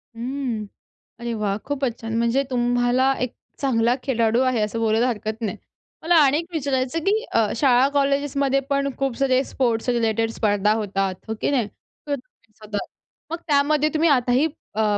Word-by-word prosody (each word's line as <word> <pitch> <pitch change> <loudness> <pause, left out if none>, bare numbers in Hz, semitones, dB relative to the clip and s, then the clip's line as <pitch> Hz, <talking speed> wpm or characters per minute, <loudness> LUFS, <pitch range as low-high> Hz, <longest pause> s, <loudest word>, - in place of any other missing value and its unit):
हं. 240 -2 -3 0.5
अरे 235 0 -3
वाह! 210 -3 -1
खूपच 265 -4 -2
छान. 225 0 -3
म्हणजे 235 +4 +2
तुम्हाला 245 +1 +2
एक 250 -2 -2 0.3
चांगला 240 -3 +2
खेळाडू 235 -2 +2
आहे, 255 -4 +1
असं 210 +2 -1
बोलायला 225 +2 +2
हरकत 220 -1 -3
नाही. 215 - -3 0.5
मला 345 +2 +3
आणि 280 +2 +4
एक 335 - -3
विचारायचं, 270 0 -1
की 430 +3 +2
अ, 225 -2 +3
शाळा 255 0 +4
कॉलेजेसमध्ये 280 -1 +1
पण 280 0 +1
खूप 270 -3 -1
सारे 265 -1 +2
स्पोर्ट्स 240 -3 -1
रिलेटेड 225 -2 +1
स्पर्धा 210 -1 +1
होतात, 195 -3 -1
हो 220 - -2
की - - +1
नाही? 245 -7 +1
तर 285 +7 -7
तुम्ही 235 -4 -18
स्वतः 210 -2 -5 0.5
मग 335 - -1
त्यामध्ये 295 +1 +3
तुम्ही 320 +2 +3
आताही 255 +2 +3 0.3
अ, 210 -1 +2
245 Hz, 165 wpm, -23 LUFS, 225-275 Hz, 0.5 s, आणि